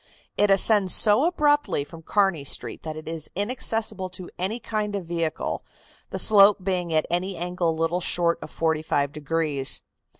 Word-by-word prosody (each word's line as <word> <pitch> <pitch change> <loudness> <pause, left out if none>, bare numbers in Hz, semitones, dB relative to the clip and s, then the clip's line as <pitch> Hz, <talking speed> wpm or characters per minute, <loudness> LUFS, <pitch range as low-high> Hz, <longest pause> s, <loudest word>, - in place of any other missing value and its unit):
It 205 - +3
ascends 195 -1 +5
so 215 +7 +4
abruptly 290 - +2
from 165 +3 -12
Kearney 195 -3 +1
Street 140 - -3
that 155 -1 -6
it 155 - -9
is 160 -1 -3
inaccessible 210 -2 -2
to 180 - -9
any 200 +6 -2
kind 215 -2 -3
of 195 -3 -4
vehicle, 165 -2 -3 0.5
the - - -4
slope 205 -2 +5
being 180 -3 -1
at 155 -1 +2
any 185 +2 -1
angle 175 -1 -1
little 165 +2 0
short 170 -1 +1
of - - -8
forty 160 -1 0
five 145 -2 0
degrees. 150 -2 -1
180 Hz, 165 wpm, -24 LUFS, 160-205 Hz, 0.5 s, ascends